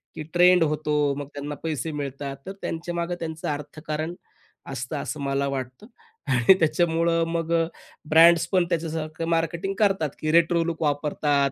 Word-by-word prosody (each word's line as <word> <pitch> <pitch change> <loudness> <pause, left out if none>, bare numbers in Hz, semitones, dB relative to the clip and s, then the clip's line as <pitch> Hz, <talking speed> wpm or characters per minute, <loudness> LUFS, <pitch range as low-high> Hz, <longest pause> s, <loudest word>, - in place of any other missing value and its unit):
की 155 - -5
ट्रेंड 180 0 +6
होतो, 150 -1 -1 0.2
मग 145 - -5
त्यांना 145 +1 -5
पैसे 160 0 -2
मिळतात, 140 -1 -5
तर 190 - -5
त्यांच्यामागे 170 +1 -3
त्यांचं 160 -1 -5
अर्थकारण 155 +2 -5 0.6
असतं 130 +5 -4
असं 150 - -5
मला 140 0 0
वाटतं. 130 - -5 0.4
आणि 130 +5 +5
त्याच्यामुळं 165 +1 +2
मग 165 0 -1 0.6
ब्रँड्स 170 +1 +6
पण 180 -2 +3
त्याच्यासारखं 160 -1 -3
मार्केटिंग 170 +3 0
करतात, 195 -8 +2
की 155 0 -1
रेट्रो 170 0 +4
लुक 165 -1 -4
वापरतात, 145 -1 +1
160 Hz, 140 wpm, -25 LUFS, 145-170 Hz, 0.6 s, ट्रेंड